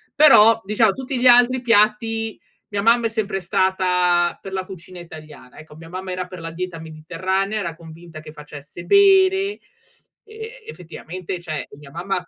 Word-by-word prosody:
Però, 230 -7 +6
diciamo 210 0 +2
tutti 265 -1 -5
gli 250 - +3
altri 245 +1 +5
piatti 225 0 +1 0.3
mia 200 -1 -2
mamma 230 +2 +3
è 225 - +1
sempre 215 -3 -3
stata 180 -1 +1
per 195 - -9
la 190 -1 -3
cucina 185 -1 -11
italiana, 155 -6 -13
ecco 155 -1 -14
mia 165 +1 -13
mamma 185 +1 -6
era 185 0 -4
per 180 0 -11
la 165 0 -6
dieta 175 -1 -6
mediterranea, 185 +6 -3
era 170 -4 -5
convinta 165 0 -13
che 155 0 -12
facesse 150 +1 -11
bene; 390 0 +4 0.7
e 445 +2 -11
effettivamente, 180 - -8
cioè, 155 -3 -6
ehm, - - -15
mia 140 -2 -14
mamma 180 +2 -4
185 Hz, 165 wpm, -20 LUFS, 165-225 Hz, 0.7 s, Però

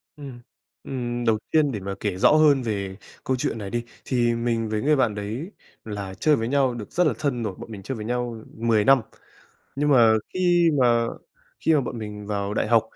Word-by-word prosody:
Ừm, 135 -5 -9 0.4
ừm, 120 -2 -3
đầu 110 -2 +3
tiên 155 -3 +3
để 105 - -4
mà 100 +1 -5
kể 100 -3 -2
rõ - - +5
hơn 150 -3 +5
về 100 -5 -3 0.3
câu 130 - 0
chuyện 115 - -2
này 100 -2 -6
đi, 120 +3 -2 0.2
thì 120 -2 +1
mình 115 -1 -1
với 105 0 -1
người 150 +2 +3
bạn 120 -6 +1
đấy 115 - -5 0.3
là 100 -3 -6
chơi 150 +9 +3
với 115 -2 -2
nhau 135 -1 +2
được 110 -3 -8
rất 175 -2 +2
là 140 - +1
thân 125 -5 -1
rồi, 100 -3 -3
bọn 115 - -10
mình 100 -2 -8
chơi 135 - -4
với 105 - -6
nhau 120 -1 -3
10 110 -2 +2
năm. 135 -3 +6 0.8
Nhưng 145 +1 +1
mà 120 -6 +6 0.2
khi 175 -2 +3
mà 120 -2 +3 0.6
khi 160 - +4
mà 150 - +4
bọn 120 -2 -5
mình 105 -1 -7
vào 100 0 -2
đại - - 0
học 115 -2 +5
120 Hz, 220 wpm, -24 LUFS, 105-135 Hz, 0.8 s, năm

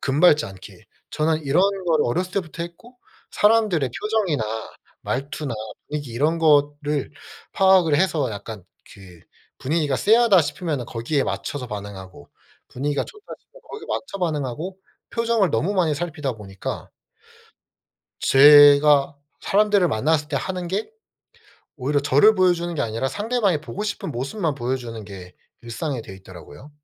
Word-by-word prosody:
금 140 +2 -1
밟지 150 -4 +5
않게. 95 -1 -13 0.3
저는 155 +1 0
이런 145 +6 +2 0.2
거를 160 -3 +2
어렸을 180 +9 -2
때부터 170 -3 -4
했고 235 +9 -12 0.3
사람들의 210 - +2
표정이나 205 - 0 0.6
말투나 140 -1 -4 0.3
분위기 145 -4 -5
이런 150 +7 0
거를 145 -2 +1 0.4
파악을 190 -5 +4
해서 155 -7 +1
약간 105 -1 -8 0.3
그 95 -4 -15 0.4
분위기가 145 -1 -1
쎄하다 215 - +4
싶으면은 155 -5 -3
거기에 125 +5 -2
맞춰서 140 -3 -4
반응하고 100 -7 -9 0.4
분위기가 140 +2 -2
좋다 420 0 -13
싶으면 - - -21
거기에 430 -1 -9
맞춰 200 -7 -4
반응하고 160 +1 -3 0.3
표정을 230 -5 +1
너무 165 - 0
많이 170 -5 +1
살피다 150 -4 -3
보니까 100 -4 -7 1.3
제가 145 0 +7 0.3
사람들을 205 -2 +2
만났을 150 +6 0
때 - - -2
하는 180 -2 -4
게 200 - -3 0.9
오히려 145 +1 0
저를 145 +10 +5
보여 185 -2 +4
주는 175 0 -4
게 - - -1
아니라 115 +4 -2
상대방이 205 - 0
보고 185 +6 -6
싶은 205 -6 -4
모습만 145 - -2
보여 130 -1 -2
주는 115 -4 -8
게 95 -3 -11 0.3
일상이 120 +3 -4
돼 95 - -11
있더라고요. 95 - -13
150 Hz, 330 characters per minute, -22 LUFS, 130-185 Hz, 1.3 s, 제가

